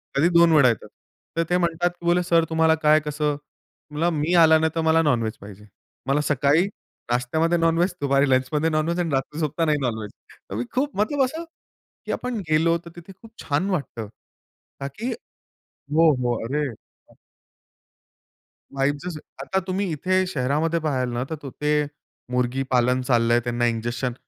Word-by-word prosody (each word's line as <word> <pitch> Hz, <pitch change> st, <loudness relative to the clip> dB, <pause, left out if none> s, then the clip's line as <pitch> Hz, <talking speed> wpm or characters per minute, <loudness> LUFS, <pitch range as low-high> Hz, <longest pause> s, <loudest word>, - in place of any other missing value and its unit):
कधी 150 Hz, +5 st, +3 dB
2 170 Hz, -1 st, +5 dB
वेळा 140 Hz, -5 st, +6 dB
येतात. 115 Hz, -, -3 dB, 0.5 s
तर 165 Hz, -, +3 dB
ते 180 Hz, -, +3 dB
म्हणतात 175 Hz, 0 st, +1 dB
की 170 Hz, -, -11 dB
बोले 175 Hz, +1 st, +3 dB
"सर 170 Hz, -1 st, +3 dB
तुम्हाला 160 Hz, 0 st, +3 dB
काय, 155 Hz, 0 st, +6 dB
कसं?" 150 Hz, 0 st, -2 dB, 0.6 s
म्हणलं 160 Hz, +3 st, +1 dB
"मी 155 Hz, +4 st, 0 dB
आलो 160 Hz, 0 st, +6 dB
ना, 160 Hz, -, +2 dB
तर 165 Hz, -, +1 dB
मला 160 Hz, 0 st, +3 dB
नॉनव्हेज 120 Hz, -8 st, 0 dB
पाहिजे. 100 Hz, +1 st, -12 dB, 0.4 s
मला 140 Hz, +2 st, +2 dB
सकाळी 145 Hz, +4 st, +3 dB, 0.5 s
नाश्त्यामध्ये 160 Hz, +8 st, +1 dB
नॉनव्हेज, 165 Hz, +2 st, +2 dB
दुपारी 140 Hz, 0 st, +2 dB
लंचमध्ये 135 Hz, +5 st, +1 dB
नॉनव्हेज 160 Hz, +3 st, 0 dB
आणि 170 Hz, -, 0 dB
रात्री 135 Hz, +3 st, -2 dB
झोपतानाही 155 Hz, 0 st, 0 dB
नॉनव्हेज." 110 Hz, -5 st, -3 dB, 0.4 s
तर 100 Hz, -, -5 dB
मी 120 Hz, -, -2 dB
खूप 280 Hz, +3 st, 0 dB
मतलब 265 Hz, +7 st, +2 dB
असं, 315 Hz, +6 st, -5 dB, 0.6 s
की -, -, -3 dB
आपण 250 Hz, -3 st, -3 dB
गेलो 165 Hz, +2 st, +3 dB
तर -, -, -9 dB
तिथे 175 Hz, +2 st, -11 dB
खूप 225 Hz, -, -14 dB
छान 150 Hz, +7 st, 0 dB
वाटतं. 140 Hz, -, -3 dB, 0.7 s
ताकी 205 Hz, -, -4 dB, 0.6 s
हो, 160 Hz, +3 st, +2 dB
हो. 125 Hz, -2 st, 0 dB
अरे 145 Hz, +5 st, -1 dB, 2.1 s
वाइब 140 Hz, +1 st, 0 dB
जसं 170 Hz, -4 st, -5 dB, 0.2 s
आता 190 Hz, +7 st, 0 dB
तुम्ही 185 Hz, -1 st, -1 dB
इथे 185 Hz, +5 st, +1 dB
शहरामध्ये 155 Hz, +2 st, 0 dB
पाहाल 135 Hz, -5 st, -1 dB
ना, 120 Hz, -, -1 dB
तर 160 Hz, -, -3 dB
तो 145 Hz, -2 st, -9 dB
ते 150 Hz, +1 st, 0 dB, 0.5 s
मुर्गीपालन 125 Hz, 0 st, +1 dB
चाललंय. 120 Hz, -2 st, +3 dB
त्यांना 120 Hz, 0 st, -1 dB
इंजेक्शन 120 Hz, +2 st, -2 dB
150 Hz, 160 wpm, -23 LUFS, 130-170 Hz, 2.1 s, वेळा